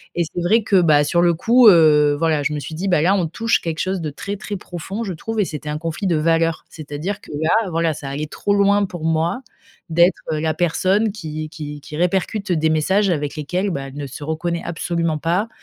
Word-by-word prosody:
Et 175 - +1
c'est 170 +2 -5
vrai 215 +6 +3
que, 200 -3 +3
bah, 150 -3 +4
sur 170 +4 +1
le 175 -1 +4
coup, 235 +7 +5
heu, 150 -5 +6
voilà, 160 -2 +1
je 150 - -1
me 150 - -2
suis 160 - -7
dit: 185 +5 -3
«Bah, 175 -5 +3
là, 180 +5 +3
on 185 -4 +1
touche 230 +8 0
quelque 165 -1 -4
chose 190 0 -1
de 155 -2 -3
très, 200 +7 -6
très 210 0 -5
profond, 190 +4 -6
je 195 - -4
trouve» 220 +7 -4
et 200 - +1
c'était 150 -1 -6
un 150 - -2
conflit 165 +4 -3
de 170 - +2
valeurs. 165 +1 +1
C'est-à-dire 155 +6 -5
que - - -14
là, 160 +1 0 0.2
voilà, 165 -1 0
ça 140 -2 -7
allait 150 +3 -4
trop 200 +6 -1
loin 200 0 +3
pour 175 -4 -8
moi, 165 +7 0 0.5
d'être 170 +3 +4
la 155 +1 0
personne 185 +6 +1
qui 155 -6 -6
qui 150 -1 -8
qui 150 0 -8
répercute 190 +3 -1
des 160 -2 +2
messages 190 +6 +2
avec 150 -3 -2
lesquels, 180 +7 -2
bah, 135 -3 -4
elle 135 - -11
ne 145 -1 -5
se 135 +3 -9
reconnaît 170 +2 -2
absolument 165 -1 -2
pas. 175 +8 -1
165 Hz, 230 wpm, -20 LUFS, 155-190 Hz, 0.5 s, heu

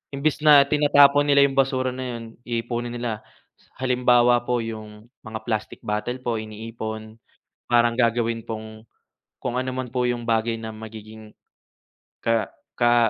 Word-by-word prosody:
imbis 145 +2 0
na 150 -2 +7
tinatapon 145 0 +5
nila 140 -1 +6
'yong 135 -1 +2
basura 130 -1 +1
na 125 -1 -5
'yon, 115 - -8 0.2
iipunin 120 0 -3
nila. 115 -3 -3 0.4
Sa 130 - -8
halimbawa 125 -1 +4
po 120 +1 -1
'yong, 110 -2 -7 0.2
mga 110 -1 -6
plastic 110 -2 -3
bottle 105 +4 -2
po 115 -2 -1
iniipon, 110 0 -7 0.5
parang 120 0 +4
gagawin 115 -1 +1
pong, 110 0 -8 0.6
kung 125 -1 -3
anuman 130 0 -2
po 125 +1 -1
'yong 120 -1 -2
bagay 115 0 +1
na 110 - -6
magiging 110 0 -11 0.9
ka 115 -2 +1 0.3
ka 120 -1 +4
120 Hz, 140 wpm, -24 LUFS, 110-125 Hz, 0.9 s, na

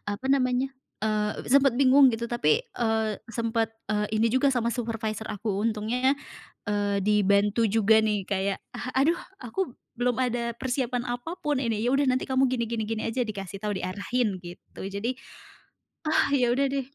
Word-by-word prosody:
apa 205 +6 -4
namanya, 255 0 +1 0.3
eee, 210 -1 -1
sempet 275 -3 +5
bingung 275 0 +7
gitu. 235 -1 -1
Tapi, 230 -11 +1
eee, 220 -2 0 0.2
sempet, 230 0 0 0.2
eee, 210 0 0
ini 225 +1 +2
juga 260 +2 +3
sama 235 -3 +1
supervisor 225 -2 -3
aku, 205 -1 -2
untungnya, 230 +5 +1 0.5
eee, 205 -1 0
dibantu 205 +2 +3
juga 220 +1 +4
nih 210 -3 0
kayak, 195 0 -1 0.2
"Ah, 255 - -5
aduh 335 +5 +3 0.2
aku 260 +8 -3 0.3
belum 245 0 +1
ada 235 -1 -1
persiapan 250 -1 -1
apapun 280 +4 -2
ini". 225 -4 -1
"Ya 245 - +2
udah, 275 0 +2
nanti 255 0 +1
kamu 265 0 +2
gini 250 -2 0
gini 230 -2 -1
gini 220 0 -2
aja", 235 +3 -1
dikasih 195 -2 -6
tahu, 210 -1 -2
diarahin 200 +2 -1
gitu. 175 0 -11
Jadi, 200 +6 -2 1.0
ah - - +3
ya 245 -3 +3
udah 275 +3 +2
deh. 275 0 -3
230 Hz, 165 wpm, -27 LUFS, 210-255 Hz, 1.0 s, bingung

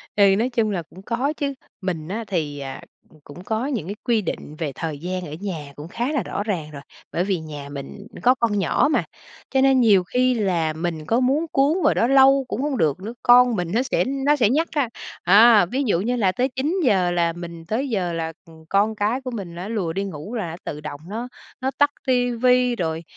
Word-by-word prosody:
Ừ, 205 - +4
nói 240 +4 +1
chung 230 -3 0
là 180 -4 -2
cũng 175 +3 -15
có 250 +7 -1
chứ, 280 -1 -1 0.3
mình 170 -5 -3
á 220 +5 -3
thì, 155 -7 -2
à, 135 -1 -6 0.3
c - - -23
cũng 145 +6 -12
có 220 +5 -2
những 240 - -3
cái 200 - -4
quy 230 -3 +2
định 155 -4 -5
về 155 -4 -2
thời 155 -4 -4
gian 180 +2 -4
ở 150 - -8
nhà 155 -8 -5
cũng 150 +2 -9
khá 240 - -2
là 285 - 0
rõ 205 - -3
ràng 170 -8 -3
rồi. 140 -2 -9 0.3
Bởi 175 - +1
vì 195 -3 -1
nhà 150 -3 -8
mình 145 +9 -8 0.2
có 250 +1 +5
con 225 -5 0
nhỏ 190 - +2
mà, - - +2 0.5
cho 265 -1 +3
nên 270 -1 +5
nhiều 205 -5 +5
khi 250 +7 +1
là 180 -8 0
mình 160 -1 -4
có 230 +8 +2
muốn 270 +6 +2
cuốn 280 +5 +3
vào - - +4
đó 230 - +2
lâu 270 0 +5
cũng 260 - -3
hông 285 -2 -1
được 155 -2 +1
nữa, 220 +4 -6
con 245 -1 +6
mình 175 -2 -2
nó 240 - +3
sẽ 265 - 0
nó 275 +2 +1
sẽ 235 -7 +3
nhắc 315 +6 +2
á. 285 -6 0 0.3
À, 210 +2 +7
ví 260 +10 -2
dụ 175 -4 +2
như 245 +5 0
là 200 -6 +2
tới 250 +8 0
9:00 260 - +1
là 170 -1 +1
mình 170 -1 -9
tới 245 +10 -2
giờ 185 -7 -1
là, 165 -1 -3
ừm, 160 -1 -16
con 205 +3 +2
cái 215 +5 0
của 255 -1 -5
mình 190 -7 -6
nó 180 +3 -6
lùa 190 -8 -2
đi 195 - -2
ngủ, 195 +4 -6
là 200 -8 -2
nó 165 - -6
tự 150 0 -5
động 145 -1 -7
nó 230 +4 -4 0.3
nó 265 - 0
tắt 290 0 +4 0.2
ti 245 -1 +2
vi 250 +1 +3
rồi, 165 -4 -2
205 Hz, 240 wpm, -22 LUFS, 170-250 Hz, 0.5 s, À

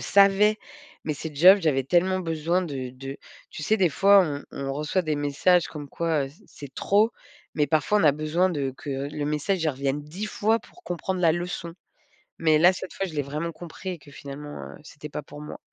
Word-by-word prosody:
savais. 200 +2 +4 0.5
Mais 155 - -1
ces 150 +1 -7
jobs, 185 +7 +8
j'avais 150 -6 +2
tellement 180 +5 +2
besoin 165 +1 0
de 135 -7 -4
de 135 +2 -8 0.3
tu - - -7
sais, 220 - +3
des 190 -4 +3
fois, 200 +5 +6
on 145 -4 -3
on 135 0 -4
reçoit 150 +6 -1
des 155 -2 -1
messages 145 +5 +2
comme 145 -2 -8
quoi, 160 -2 0
heu, - - -9
c'est 170 +10 -20 0.2
c'est 135 - -22
trop, 210 +3 +3 0.4
mais 150 - +2
parfois 160 +7 +2
on 205 - +2
a 150 - +6
besoin 155 +5 +1
de 140 -5 -2
que 145 - -7 0.2
le 150 0 -3
message 150 +5 -1
il 160 - +2
revienne 140 +1 -2
10 175 +9 -6
fois 220 +1 +1
pour 360 - -19
comprendre 180 +1 -3
la 165 -3 +5
leçon. 175 0 -4 0.7
Mais 155 -2 +5
là, 175 +4 +7
cette 185 - -7
fois, 195 - -2
je 175 - -8
l'ai 150 - 0
vraiment 150 +4 -4
compris 175 +3 -8
et 180 - -4
que 145 -2 -17
finalement, 145 +1 -8
heu, - - -10
c'était 150 0 -10
pas 150 - -5
pour 145 +1 -11
moi. 150 - -8
160 Hz, 215 wpm, -25 LUFS, 145-185 Hz, 0.7 s, jobs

